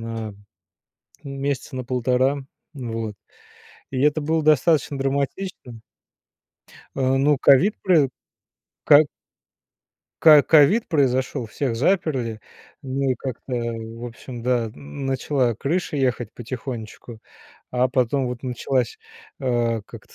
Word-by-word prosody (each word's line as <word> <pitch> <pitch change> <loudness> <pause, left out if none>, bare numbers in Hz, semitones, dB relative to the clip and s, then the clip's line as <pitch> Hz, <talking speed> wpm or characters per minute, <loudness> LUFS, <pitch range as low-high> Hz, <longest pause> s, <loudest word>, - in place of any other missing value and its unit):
на, 115 -1 -5 0.9
ну, 140 - -7
месяца 135 -1 -3
на 130 -1 -4
1,5. 130 +2 +1 0.3
Вот. 115 -5 -5 0.8
И 130 - -2
это 150 +1 +3
было 160 +2 0
достаточно 155 -1 +3
драматичным. 135 - -3 1.2
Э, - - -3 0.2
ну, 145 +2 +3
ковид 175 +10 +5
прои 165 -8 +4 0.8
ко 145 +2 +8 1.2
Ко 155 -2 +9
ковид 165 +9 +5
произошёл, 130 -4 0
всех 120 +2 -2
заперли, 130 - 0 0.4
ну, 135 0 -1
и - - +2
как-то, 130 0 -7
в 115 0 -5
общем, 120 +1 -9
да, 125 -2 +1
н 75 - -9
начала 135 -2 0
крыша 165 +3 -2
ехать 125 -5 0
потихонечку, 120 -1 -7 0.5
а 125 +1 +2
потом 130 +1 +1
вот 125 +1 -6
началась, 125 0 -1 0.4
э, 120 -3 0
как - - -12
это - - -20
130 Hz, 115 wpm, -23 LUFS, 120-140 Hz, 1.2 s, Ко